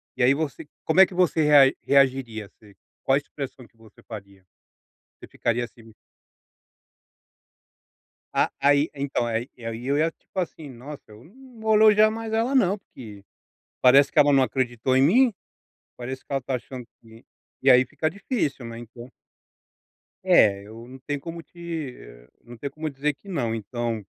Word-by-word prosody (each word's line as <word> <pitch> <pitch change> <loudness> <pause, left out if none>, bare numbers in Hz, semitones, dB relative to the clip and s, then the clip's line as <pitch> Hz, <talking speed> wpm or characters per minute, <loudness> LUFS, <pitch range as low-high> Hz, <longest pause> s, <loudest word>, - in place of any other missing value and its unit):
E - - -4
aí 130 +3 +5
você 150 0 -4 0.2
como 160 +3 +2
é 190 - +10
que 185 - -12
você 175 -3 +2
rea 145 -2 +6
reagiria 130 -5 +1
assim 100 +1 -20 0.3
quais 140 +2 +2
as - - -33
expressão 135 -3 -7
que - - -37
você 110 -2 -20
faria, 100 -4 -11 0.8
você - - -11
ficaria 120 +1 -1
assim 120 -1 -17 2.5
Ah, - - +1
aí 145 +2 +3
então, 140 -3 -2
aí 115 +2 -3
eu 115 -2 -6 0.2
ia 160 +2 +1
tipo 190 - -9
assim: 160 -4 -5
"Nossa! 135 +4 -10
Eu 105 +2 -15
não 250 - -17
vou 220 0 +2
elogiar 215 0 +6
mais 225 0 -6
ela 230 +4 0
não, 200 -7 +3
porque 110 - -13 0.6
parece 135 +2 +6
que 155 - -1
ela 145 0 +6
não 135 -1 +5
acreditou 130 0 0
em 130 - +4
mim, 235 - +4 0.6
parece 130 +2 -7
que - - -11
ela 135 - +1
está 130 +1 -4
achando 125 0 -7
que" 115 +1 -17 0.4
e 135 - +5
aí 125 0 +7
fica 155 +5 -2
difícil, 190 - -3
né, 115 0 -8
então. 120 +1 -11 1.1
É, 100 -2 +4
eu 115 +2 -11
não 130 +1 -12
tenho 145 +2 -4
como 165 +4 -8
te 165 -7 -7
ham - - -15 0.2
não 120 0 -12
tenho 140 +3 -6
como 155 +2 -5
dizer 145 +1 -2
que 175 - -23
não 120 -11 -1
então 115 0 -4
135 Hz, 170 wpm, -24 LUFS, 120-160 Hz, 2.5 s, é